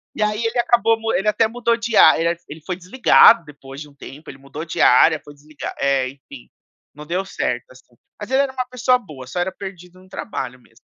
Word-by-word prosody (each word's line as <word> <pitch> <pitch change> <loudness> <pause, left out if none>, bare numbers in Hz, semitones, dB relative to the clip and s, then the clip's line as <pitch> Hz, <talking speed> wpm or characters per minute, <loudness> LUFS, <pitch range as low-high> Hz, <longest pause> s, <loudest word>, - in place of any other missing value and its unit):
E, 215 - -3
aí, 210 +2 0
ele 230 +2 -2
acabou 230 -1 +2
mu 225 0 -2
ele 205 +3 0
até 220 +1 +2
mudou 235 0 -1
de 230 -1 -3
a 155 - +7
eh, 170 +1 0
ele 155 +2 -10
foi 185 - -4
desligado 195 +1 +5
depois 140 -2 -12
de 150 - -9
um 145 - -21
tempo, 145 +2 -12
ele 135 - -12
mudou 140 +3 -8
de 170 - -6
área, 155 +5 +5
foi 145 - -14
desliga 145 -1 -9
é, 135 -2 +1
enfim, 135 -1 -14 0.5
não 150 +1 -11
deu 180 +4 -2
certo, - - -3
assim. - - -20 0.2
Mas - - -8
ele 265 +1 +3
era 275 -1 -3
uma 255 -1 -4
pessoa 250 0 +1
boa, 150 - -12
só 130 +7 -6
era 185 +2 -2
perdido 185 -2 -11
no 185 - -20
trabalho 125 - -6
mesmo. 115 -1 -25
180 Hz, 230 wpm, -20 LUFS, 145-225 Hz, 0.5 s, a